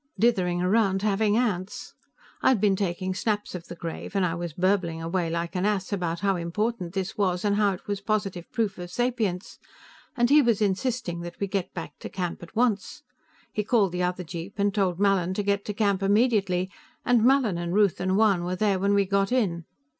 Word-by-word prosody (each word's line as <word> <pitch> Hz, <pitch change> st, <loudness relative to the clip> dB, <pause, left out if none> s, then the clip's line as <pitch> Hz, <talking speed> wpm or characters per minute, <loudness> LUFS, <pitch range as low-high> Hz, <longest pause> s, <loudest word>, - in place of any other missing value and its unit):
"Dithering 180 Hz, -7 st, +2 dB
around 195 Hz, 0 st, +2 dB
having 210 Hz, +1 st, +2 dB
ants. 205 Hz, -6 st, -2 dB, 0.5 s
I'd 255 Hz, -5 st, +4 dB
been 200 Hz, -1 st, +3 dB
taking 185 Hz, -1 st, -2 dB
snaps 210 Hz, +1 st, -2 dB
of 175 Hz, -2 st, -7 dB
the 175 Hz, -, -8 dB
grave, 170 Hz, +3 st, -6 dB
and 195 Hz, -2 st, +3 dB
I 165 Hz, -, 0 dB
was 170 Hz, 0 st, -4 dB
burbling 180 Hz, -1 st, 0 dB
away 165 Hz, +1 st, -1 dB
like 170 Hz, +2 st, -3 dB
an 180 Hz, -, 0 dB
ass 205 Hz, -1 st, 0 dB
about 170 Hz, -3 st, -2 dB
how 195 Hz, -2 st, +1 dB
important 180 Hz, +2 st, -2 dB
this 190 Hz, +1 st, -3 dB
was 185 Hz, -1 st, +1 dB
and 200 Hz, -1 st, +2 dB
how 205 Hz, -1 st, +3 dB
it 185 Hz, -, -10 dB
was 200 Hz, -1 st, -3 dB
positive 200 Hz, -4 st, -2 dB
proof 220 Hz, -6 st, -1 dB
of 175 Hz, 0 st, -6 dB
sapience, 220 Hz, -4 st, -2 dB, 0.6 s
and 240 Hz, +1 st, +3 dB
he 300 Hz, +1 st, +8 dB
was 235 Hz, -5 st, +2 dB
insisting 205 Hz, -2 st, -1 dB
that 175 Hz, 0 st, -8 dB
we 200 Hz, -, 0 dB
get 195 Hz, -2 st, -2 dB
back 170 Hz, -, -7 dB
to -, -, -7 dB
camp 180 Hz, -3 st, -4 dB
at 170 Hz, +4 st, -12 dB
once. 225 Hz, -4 st, 0 dB, 0.5 s
He 210 Hz, -, -1 dB
called 205 Hz, -4 st, +2 dB
the 180 Hz, +1 st, -2 dB
other 180 Hz, 0 st, -1 dB
jeep 170 Hz, +4 st, -7 dB
and 200 Hz, 0 st, +1 dB
told 190 Hz, -4 st, 0 dB
Mallin 190 Hz, -3 st, +2 dB
to 205 Hz, -, -1 dB
get 200 Hz, 0 st, 0 dB
to -, -, -2 dB
camp 200 Hz, -3 st, +1 dB
immediately, 195 Hz, -3 st, +2 dB, 0.3 s
and 245 Hz, -3 st, +4 dB
Mallin 245 Hz, -8 st, +3 dB
and 170 Hz, 0 st, -3 dB
Ruth 205 Hz, -3 st, +3 dB
and 185 Hz, +1 st, +1 dB
Juan 205 Hz, -5 st, +3 dB
were 180 Hz, +1 st, -2 dB
there 200 Hz, -1 st, +1 dB
when 200 Hz, +1 st, +2 dB
we 200 Hz, -1 st, +3 dB
got 195 Hz, +1 st, +1 dB
in. 185 Hz, -10 st, 0 dB
195 Hz, 205 wpm, -26 LUFS, 180-210 Hz, 0.6 s, he